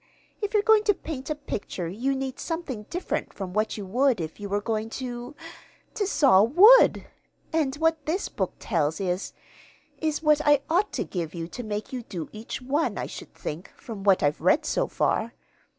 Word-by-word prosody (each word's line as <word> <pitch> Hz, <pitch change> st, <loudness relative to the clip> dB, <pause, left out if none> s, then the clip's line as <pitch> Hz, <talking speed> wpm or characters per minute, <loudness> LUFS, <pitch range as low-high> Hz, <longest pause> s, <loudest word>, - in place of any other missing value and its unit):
If 415 Hz, +1 st, -2 dB
you're 415 Hz, -, +4 dB
going 440 Hz, -1 st, +5 dB
to 410 Hz, -, +4 dB
paint 285 Hz, -5 st, -6 dB
a 305 Hz, -, 0 dB
picture 205 Hz, -, -5 dB
you 245 Hz, +10 st, -1 dB
need 265 Hz, -1 st, -4 dB
something 280 Hz, -11 st, -4 dB
different 355 Hz, +2 st, -3 dB
from 190 Hz, -2 st, -6 dB
what 215 Hz, +2 st, 0 dB
you 205 Hz, -, -5 dB
would 250 Hz, +3 st, +2 dB
if 160 Hz, +2 st, -5 dB
you 205 Hz, -1 st, -6 dB
were 205 Hz, +1 st, +1 dB
going 220 Hz, +1 st, -2 dB
to 245 Hz, +2 st, -6 dB, 0.6 s
to 410 Hz, -3 st, -1 dB
saw 270 Hz, -, +5 dB
wood; 380 Hz, -, +7 dB, 0.5 s
and 295 Hz, -4 st, +1 dB
what 320 Hz, -1 st, 0 dB
this 355 Hz, +6 st, 0 dB
book -, -, -3 dB
tells 160 Hz, -5 st, -1 dB
is 185 Hz, -1 st, -2 dB, 0.7 s
is 315 Hz, 0 st, -1 dB
what 300 Hz, -1 st, +4 dB
I 290 Hz, -2 st, +5 dB
ought 385 Hz, +5 st, +2 dB
to -, -, -1 dB
give 170 Hz, -3 st, -5 dB
you 165 Hz, -1 st, -4 dB
to 245 Hz, -, -6 dB
make 215 Hz, +1 st, -5 dB
you 255 Hz, -, -3 dB
do 175 Hz, -8 st, -6 dB
each 220 Hz, +3 st, -7 dB
one, 285 Hz, +5 st, 0 dB
I -, -, -2 dB
should -, -, -10 dB
think, 160 Hz, +5 st, -6 dB
from 215 Hz, -5 st, -8 dB
what 195 Hz, -4 st, +4 dB
I've 145 Hz, +1 st, +1 dB
read 275 Hz, -, +3 dB
so -, -, 0 dB
far. -, -, 0 dB
250 Hz, 195 wpm, -26 LUFS, 200-310 Hz, 0.7 s, wood